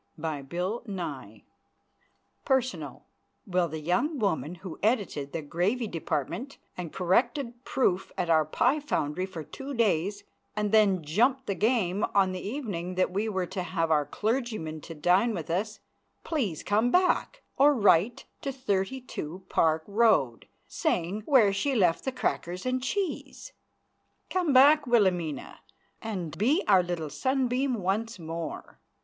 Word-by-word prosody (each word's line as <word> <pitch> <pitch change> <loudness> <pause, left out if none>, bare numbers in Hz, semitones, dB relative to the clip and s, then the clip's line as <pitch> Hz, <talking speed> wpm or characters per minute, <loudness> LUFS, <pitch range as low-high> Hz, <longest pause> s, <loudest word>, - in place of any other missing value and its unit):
PERSONAL 260 -1 -1 0.4
Will 180 -4 +1
the 160 0 -5
young 180 - 0
woman 180 - -1
who 180 -2 -9
edited 200 - 0
the 160 - -4
gravy 185 - 0
department 190 - -3 0.2
and 175 -3 -6
corrected 240 - 0
proof 195 -10 0
at 180 - -1
our 160 -2 +4
pie 250 - +1
foundry 185 - -2
for 170 -4 -7
two 270 - -7
days 200 -2 +1 0.3
and 210 -1 -1
then 200 -5 +4
jumped 245 - +2
the 200 - -1
game 210 -2 +1
on 195 -2 +4
the 185 -1 -5
evening 200 -7 -4
that 185 0 +1
we 205 +4 -1
were 190 -3 -1
to 185 +2 -4
have 165 -2 -1
our 150 -2 +3
clergyman 215 - -2
to 165 - -9
dine 185 +9 +3
with 165 -2 -5
us, 210 +5 -2 0.4
please 225 - -2
come 215 +4 +2
back, 365 - +1
or 285 +2 +6
write 205 0 +3 0.2
to 275 - -2
32 200 - -3
Park 160 0 +2
Row, 205 - +3 0.3
saying 180 +5 -1
where 235 -9 +5
she 265 +8 0
left 180 -7 +2
the 265 - 0
crackers 185 -7 -3
and 255 0 0
cheese? 390 - -3 0.8
Come 360 -5 +1
back, 285 +2 +6
Wilhelmina, 185 -10 +1 0.4
and 180 -8 -4
be 275 - +3
our 190 -3 +6
little 175 -4 -4
sunbeam 260 - 0
once 215 +3 -2
more. 165 -1 -6
200 Hz, 135 wpm, -28 LUFS, 175-250 Hz, 0.8 s, or